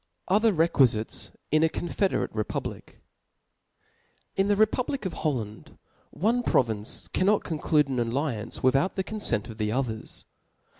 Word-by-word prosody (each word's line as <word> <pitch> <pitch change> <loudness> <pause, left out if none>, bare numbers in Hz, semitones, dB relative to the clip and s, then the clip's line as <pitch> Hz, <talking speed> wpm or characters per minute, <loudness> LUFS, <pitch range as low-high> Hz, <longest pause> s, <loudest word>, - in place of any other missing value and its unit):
Oiher 215 +3 +5
Reqtfijites 135 - +2 0.2
in 155 +1 +4
a 160 - +4
confederate 185 +4 -1
Republic^ 110 -1 -3
' - - -42
T - - -21 1.4
N 195 - +4
the 205 - +3
republic 220 +4 +1
of 185 - -2
Holland 115 -9 -4 0.3
one 230 +7 +1
province 110 - 0
cannot 200 +3 +2
•*■ - - -21
conclude 150 -2 +1
an 130 -2 -2
alliance 120 -1 -2
without 135 +8 +3
the 190 - 0
confent 205 - -1
of 115 -1 -10
the 105 0 0
'Others. 115 -3 -3
150 Hz, 145 wpm, -27 LUFS, 115-195 Hz, 1.4 s, Oiher